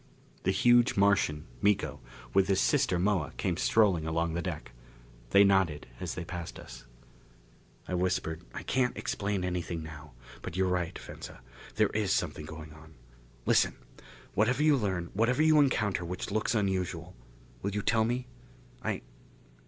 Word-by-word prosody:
The -, -, +3 dB
huge 120 Hz, +5 st, +4 dB
Martian, 100 Hz, -7 st, +3 dB, 0.2 s
Miko, 105 Hz, -1 st, +1 dB, 0.3 s
with 95 Hz, -, +4 dB
his 95 Hz, -1 st, +2 dB
sister 90 Hz, -, +2 dB
Moa 90 Hz, -5 st, 0 dB
came -, -, 0 dB
strolling 95 Hz, -8 st, +3 dB
along 80 Hz, 0 st, 0 dB
the 85 Hz, -, -1 dB
deck. -, -, -5 dB, 0.6 s
They 100 Hz, +10 st, +7 dB
nodded 95 Hz, -7 st, +2 dB
as 90 Hz, -2 st, -4 dB
they 90 Hz, -, -5 dB
passed 85 Hz, -1 st, -6 dB
us. -, -, -11 dB, 1.0 s
I -, -, -4 dB
whispered, 90 Hz, -2 st, -1 dB
"I -, -, -7 dB
can't 125 Hz, -1 st, 0 dB
explain 100 Hz, -2 st, -2 dB
anything 90 Hz, -2 st, -3 dB
now. 75 Hz, -2 st, -10 dB, 0.3 s
But 85 Hz, -, -6 dB
you're 95 Hz, 0 st, +2 dB
right, 90 Hz, -2 st, -1 dB
Venza: -, -, -10 dB, 0.3 s
there -, -, +3 dB
is 105 Hz, -3 st, 0 dB
something 75 Hz, -5 st, -1 dB
going 80 Hz, -1 st, -9 dB
on. 80 Hz, 0 st, -15 dB, 0.5 s
Listen! -, -, +3 dB, 0.6 s
Whatever 125 Hz, +7 st, +2 dB
you 155 Hz, -1 st, +5 dB
learn 95 Hz, -8 st, -2 dB
whatever 120 Hz, +8 st, +2 dB
you 155 Hz, -1 st, +6 dB
encounter 110 Hz, -10 st, +2 dB
which 90 Hz, +3 st, -5 dB
looks 110 Hz, +4 st, 0 dB
unusual 95 Hz, -4 st, -1 dB, 0.5 s
will 100 Hz, -, -2 dB
you 105 Hz, -, -1 dB
tell 110 Hz, -1 st, +3 dB
me? 120 Hz, +3 st, -1 dB, 0.6 s
I -, -, -2 dB
95 Hz, 155 wpm, -30 LUFS, 85-105 Hz, 1.0 s, They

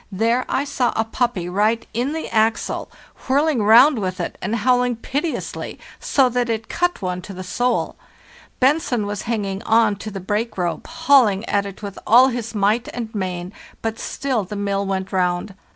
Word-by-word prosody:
There 230 Hz, +6 st, +1 dB
I 275 Hz, -, +1 dB
saw 260 Hz, -4 st, 0 dB
a 225 Hz, -, +1 dB
puppy 225 Hz, -6 st, -1 dB
right 210 Hz, +5 st, +1 dB
in 250 Hz, +6 st, -1 dB
the 320 Hz, -, -4 dB
axle, 220 Hz, 0 st, +1 dB, 0.4 s
whirling 280 Hz, -1 st, +2 dB
round 235 Hz, +6 st, +6 dB
with 185 Hz, -2 st, -3 dB
it -, -, -3 dB
and 225 Hz, -, -1 dB
howl 250 Hz, +2 st, +3 dB
ing 250 Hz, -1 st, 0 dB
piteously, 285 Hz, +7 st, -4 dB, 0.2 s
so 270 Hz, -2 st, +3 dB
that 245 Hz, -1 st, -1 dB
it 225 Hz, -1 st, -2 dB
cut 355 Hz, -, -1 dB
one 180 Hz, 0 st, -2 dB
to 195 Hz, +2 st, -9 dB
the 185 Hz, -, -6 dB
soul. 245 Hz, +7 st, -1 dB, 0.6 s
Bentzen 265 Hz, -4 st, +2 dB
was 205 Hz, 0 st, -3 dB
hanging 200 Hz, -4 st, -2 dB
on 225 Hz, -2 st, +3 dB
to 215 Hz, -, -6 dB
the 195 Hz, -2 st, -6 dB
brake 210 Hz, +4 st, -2 dB
rope, 175 Hz, -2 st, -2 dB
hauling 230 Hz, -8 st, +3 dB
at 200 Hz, -1 st, 0 dB
it 200 Hz, +2 st, -10 dB
with 200 Hz, -2 st, -6 dB
all 250 Hz, +4 st, +7 dB
his 240 Hz, -3 st, -3 dB
6 -, -, -9 dB
FPARTHEST -, -, -12 dB
NORTH 205 Hz, -, -2 dB
might 215 Hz, +4 st, +2 dB
and 230 Hz, -2 st, -5 dB
main; 185 Hz, -2 st, -4 dB, 0.3 s
but 225 Hz, 0 st, -2 dB
still 260 Hz, -6 st, -2 dB
the 195 Hz, +3 st, -7 dB
mill 200 Hz, -1 st, -1 dB
went 190 Hz, -1 st, -2 dB
round. 180 Hz, +1 st, 0 dB
220 Hz, 195 wpm, -21 LUFS, 195-245 Hz, 0.6 s, all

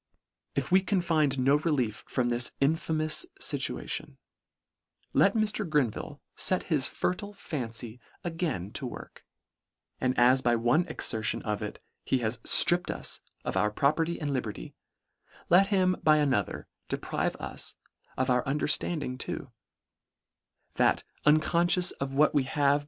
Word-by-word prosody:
If -, -, -2 dB
we 190 Hz, +1 st, +6 dB
can 190 Hz, +1 st, 0 dB
find 155 Hz, -6 st, +1 dB
no 135 Hz, +3 st, +4 dB
relief 140 Hz, -9 st, -1 dB
from 125 Hz, -2 st, 0 dB
this 120 Hz, +1 st, +1 dB
infamous 155 Hz, -, +1 dB, 0.2 s
fituation, -, -, -3 dB, 1.0 s
let -, -, +4 dB
Mr. 215 Hz, -3 st, 0 dB
Grenville 145 Hz, 0 st, -1 dB
fet 185 Hz, -, 0 dB
his 135 Hz, -4 st, +2 dB
fertile 205 Hz, +3 st, -3 dB
fancy 120 Hz, -, -5 dB, 0.2 s
again 165 Hz, -, -3 dB
to -, -, -4 dB
work, -, -, -10 dB, 0.8 s
and 130 Hz, 0 st, 0 dB
as 125 Hz, +2 st, +5 dB
by 120 Hz, -1 st, +2 dB
one 120 Hz, +10 st, +2 dB
exertion 110 Hz, -2 st, -2 dB
of 105 Hz, -2 st, -2 dB
it, -, -, -7 dB, 0.2 s
he 130 Hz, -, +1 dB
has 120 Hz, 0 st, -2 dB
Stripped 175 Hz, 0 st, +6 dB
us -, -, -3 dB, 0.3 s
of -, -, -3 dB
our 105 Hz, -, +2 dB
property 155 Hz, +9 st, 0 dB
and 145 Hz, -2 st, -2 dB
liberty, 110 Hz, -, -4 dB, 0.8 s
let 190 Hz, +3 st, +6 dB
him 185 Hz, -3 st, +2 dB
by 155 Hz, -1 st, +5 dB
another 135 Hz, -9 st, 0 dB, 0.2 s
deprive -, -, -2 dB
us -, -, -7 dB, 0.4 s
of 130 Hz, -, 0 dB
our 125 Hz, 0 st, +2 dB
understand 150 Hz, +2 st, 0 dB
ing 125 Hz, 0 st, -5 dB
too, 135 Hz, -, -5 dB, 1.3 s
that -, -, +3 dB, 0.2 s
unconfcious 170 Hz, +4 st, +3 dB
of 135 Hz, 0 st, -3 dB
what 150 Hz, +1 st, +4 dB
we 145 Hz, -, +3 dB
have 135 Hz, +3 st, -5 dB
LETTER 140 Hz, 0 st, +5 dB
IX. -, -, -4 dB
145 Hz, 145 wpm, -28 LUFS, 125-170 Hz, 1.3 s, we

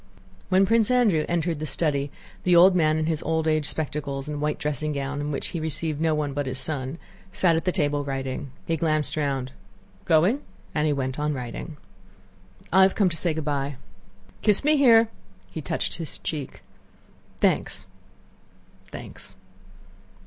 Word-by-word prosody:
When 190 Hz, +1 st, +5 dB
Prince 225 Hz, +1 st, +3 dB
Andrew 220 Hz, -11 st, +3 dB
entered 170 Hz, -2 st, 0 dB
the 155 Hz, -, -3 dB
study 145 Hz, -4 st, 0 dB, 0.3 s
the 180 Hz, -, +4 dB
old 180 Hz, +2 st, +7 dB
man 155 Hz, -3 st, +3 dB
in 155 Hz, -, 0 dB
his 160 Hz, -1 st, -1 dB
old 160 Hz, 0 st, 0 dB
age 155 Hz, -2 st, +2 dB
spectacles 145 Hz, -2 st, -3 dB
and 150 Hz, -1 st, -4 dB
white 150 Hz, 0 st, 0 dB
dressing 150 Hz, +1 st, -2 dB
gown, 140 Hz, +1 st, -3 dB
in 145 Hz, -, -3 dB
which 145 Hz, -, -3 dB
he 170 Hz, -, -4 dB
received 155 Hz, -1 st, -2 dB
no 160 Hz, -1 st, +2 dB
one 150 Hz, -2 st, -1 dB
but 145 Hz, -1 st, -2 dB
his 130 Hz, 0 st, -3 dB
son, 135 Hz, 0 st, -3 dB, 0.3 s
sat 175 Hz, -3 st, +3 dB
at 165 Hz, -, -1 dB
the 180 Hz, -, +2 dB
table 145 Hz, -5 st, 0 dB
writing. 135 Hz, -1 st, -4 dB, 0.2 s
He 165 Hz, -, 0 dB
glanced 155 Hz, -2 st, 0 dB
round. 135 Hz, -4 st, -1 dB, 0.5 s
"Going?" 180 Hz, -, +3 dB, 0.3 s
And 150 Hz, 0 st, +1 dB
he -, -, +2 dB
went 130 Hz, 0 st, -2 dB
on 150 Hz, 0 st, 0 dB
writing. 125 Hz, +5 st, -6 dB, 1.0 s
"I've 190 Hz, +1 st, +6 dB
come 200 Hz, -4 st, +3 dB
to 170 Hz, -, -2 dB
say 165 Hz, -1 st, 0 dB
good 160 Hz, -2 st, -3 dB
by." 140 Hz, -1 st, -1 dB, 0.7 s
"Kiss 210 Hz, +2 st, +4 dB
me 305 Hz, +1 st, +4 dB
here," 240 Hz, -6 st, +7 dB
and 230 Hz, -, -2 dB, 0.4 s
he 160 Hz, -, -5 dB
touched -, -, -2 dB
his 165 Hz, -3 st, -6 dB
cheek: 145 Hz, -4 st, -5 dB, 0.7 s
"Thanks, 95 Hz, -, 0 dB, 1.0 s
thanks!" -, -, -9 dB
155 Hz, 170 wpm, -25 LUFS, 145-170 Hz, 1.0 s, old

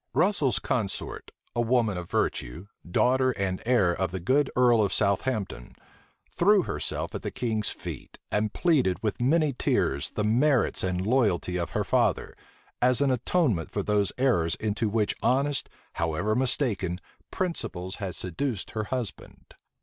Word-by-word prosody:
Russel's 180 Hz, -10 st, +2 dB
consort, 110 Hz, -6 st, -3 dB, 0.3 s
a 120 Hz, -, +2 dB
woman 115 Hz, -3 st, +2 dB
of 90 Hz, -1 st, -6 dB
virtue, 65 Hz, +10 st, -2 dB, 0.2 s
daughter 130 Hz, +7 st, +3 dB
and 95 Hz, -3 st, -2 dB
heir 110 Hz, -9 st, +3 dB
of 95 Hz, +1 st, -1 dB
the 95 Hz, -, -4 dB
good 135 Hz, +10 st, +2 dB
earl 120 Hz, -3 st, +5 dB
of 100 Hz, -, +1 dB
Southampton, 100 Hz, -, -1 dB, 0.6 s
threw 200 Hz, +1 st, +4 dB
herself -, -, -3 dB
at -, -, -4 dB
the -, -, -3 dB
king's 110 Hz, -4 st, -1 dB
feet -, -, -8 dB
and 105 Hz, 0 st, 0 dB
pleaded 135 Hz, -, +2 dB
with 105 Hz, +1 st, -2 dB
many 150 Hz, +3 st, +3 dB
tears 70 Hz, -, 0 dB
the 105 Hz, -, -3 dB
merits 125 Hz, +5 st, +2 dB
and 90 Hz, 0 st, -1 dB
loyalty 105 Hz, -7 st, +1 dB
of 85 Hz, -2 st, -2 dB
her -, -, +1 dB
father, -, -, +1 dB, 0.5 s
as 125 Hz, 0 st, +4 dB
an 140 Hz, -1 st, +3 dB
atonement 125 Hz, -, +1 dB
for 100 Hz, -, -2 dB
those 100 Hz, -2 st, +1 dB
errors 110 Hz, -12 st, +2 dB
into 110 Hz, +1 st, -1 dB
which 105 Hz, -1 st, +1 dB
honest, 140 Hz, +1 st, +1 dB, 0.2 s
however 85 Hz, +6 st, -1 dB
mistaken, 110 Hz, -8 st, 0 dB, 0.3 s
principles 100 Hz, -, -3 dB
had 95 Hz, -3 st, -4 dB
seduced 105 Hz, +4 st, -3 dB
her 110 Hz, -1 st, -3 dB
husband. 125 Hz, -3 st, -6 dB
110 Hz, 150 wpm, -27 LUFS, 95-130 Hz, 0.6 s, earl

